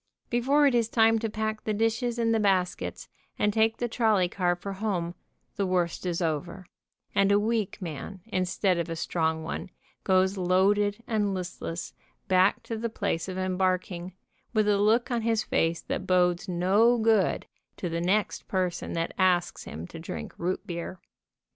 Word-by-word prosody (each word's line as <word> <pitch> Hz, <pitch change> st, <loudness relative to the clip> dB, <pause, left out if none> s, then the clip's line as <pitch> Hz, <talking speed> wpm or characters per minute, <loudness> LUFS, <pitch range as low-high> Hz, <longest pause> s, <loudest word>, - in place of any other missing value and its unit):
Before 270 Hz, +5 st, +3 dB
it 275 Hz, -, +4 dB
is 230 Hz, -2 st, +2 dB
time 225 Hz, -1 st, +4 dB
to 225 Hz, 0 st, -2 dB
pack 215 Hz, 0 st, -3 dB
the 215 Hz, -, -1 dB
dishes 225 Hz, +2 st, 0 dB
in 230 Hz, -1 st, +1 dB
the 225 Hz, -, +3 dB
baskets 190 Hz, -3 st, 0 dB, 0.3 s
and 210 Hz, 0 st, +1 dB
take 225 Hz, +1 st, +2 dB
the 240 Hz, -, -1 dB
trolley 220 Hz, -6 st, +2 dB
car 175 Hz, -1 st, 0 dB
for 195 Hz, +3 st, -6 dB
home, 190 Hz, -4 st, -2 dB, 0.4 s
the 200 Hz, -, +1 dB
worst 180 Hz, 0 st, 0 dB
is 175 Hz, 0 st, -1 dB
over, 160 Hz, +4 st, -3 dB, 0.5 s
and 200 Hz, 0 st, +3 dB
a 200 Hz, -, +5 dB
weak 220 Hz, -1 st, -1 dB
man 175 Hz, +4 st, -6 dB
instead 185 Hz, -2 st, 0 dB
of 170 Hz, -, -2 dB
a 165 Hz, -, -3 dB
strong 160 Hz, -1 st, -1 dB
one 160 Hz, -, -5 dB, 0.3 s
goes 190 Hz, +1 st, +3 dB
loaded 200 Hz, +4 st, +2 dB
and 205 Hz, -3 st, 0 dB
listless 180 Hz, -2 st, -5 dB, 0.3 s
back 185 Hz, +1 st, +3 dB
to 225 Hz, -, -4 dB
the 230 Hz, +1 st, -2 dB
place 200 Hz, -5 st, -2 dB
of 185 Hz, -, -5 dB
em 185 Hz, -1 st, -1 dB
barking, 185 Hz, -1 st, -1 dB, 0.4 s
with 215 Hz, -1 st, +3 dB
a 205 Hz, -1 st, +3 dB
look 230 Hz, +5 st, +3 dB
on 235 Hz, -1 st, +1 dB
his 225 Hz, -1 st, +1 dB
face 165 Hz, 0 st, 0 dB
that -, -, -4 dB
bodes 180 Hz, 0 st, +2 dB
no' 195 Hz, +7 st, +4 dB
good 220 Hz, -4 st, +2 dB, 0.3 s
to 180 Hz, -, -3 dB
the 170 Hz, 0 st, -2 dB
next 195 Hz, +4 st, 0 dB
person 185 Hz, -2 st, -1 dB
that 165 Hz, 0 st, -1 dB
asks 180 Hz, -2 st, +2 dB
him 80 Hz, +3 st, -7 dB
to 165 Hz, -, -10 dB
drink 165 Hz, -, -6 dB
root 180 Hz, +2 st, -2 dB
beer. 170 Hz, +1 st, -5 dB
190 Hz, 175 wpm, -27 LUFS, 180-220 Hz, 0.5 s, a